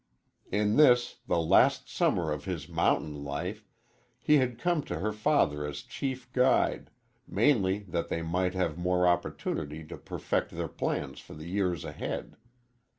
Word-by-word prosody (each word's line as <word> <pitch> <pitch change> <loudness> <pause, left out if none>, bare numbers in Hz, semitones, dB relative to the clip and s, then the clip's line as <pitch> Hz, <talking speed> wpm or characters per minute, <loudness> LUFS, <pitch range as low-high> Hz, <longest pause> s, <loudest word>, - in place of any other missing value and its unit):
In 105 +1 +2
this, 125 -5 +5
the - - +2
last 80 - +4
summer 80 -3 +1
of 75 -1 -4
his 80 -6 -4
mountain 75 -2 0
life, 90 +9 -4 0.5
he 150 +4 +4
had 125 -3 0
come 175 +3 +1
to - - -4
her 105 +6 -1
father 75 -8 +2
as 75 -1 -5
chief 130 -2 -5
guide, 130 +1 +2 0.4
mainly 105 -8 +2
that 85 0 -2
they 85 - -2
might 90 +3 0
have 85 -3 -1
more 90 0 +2
opportunity 80 -3 -1
to 75 - -9
perfect - - -2
their - - -4
plans - - -3
for - - -12
the 75 +2 -9
years 90 -2 -1
ahead. - - -5
90 Hz, 150 wpm, -29 LUFS, 80-115 Hz, 0.5 s, this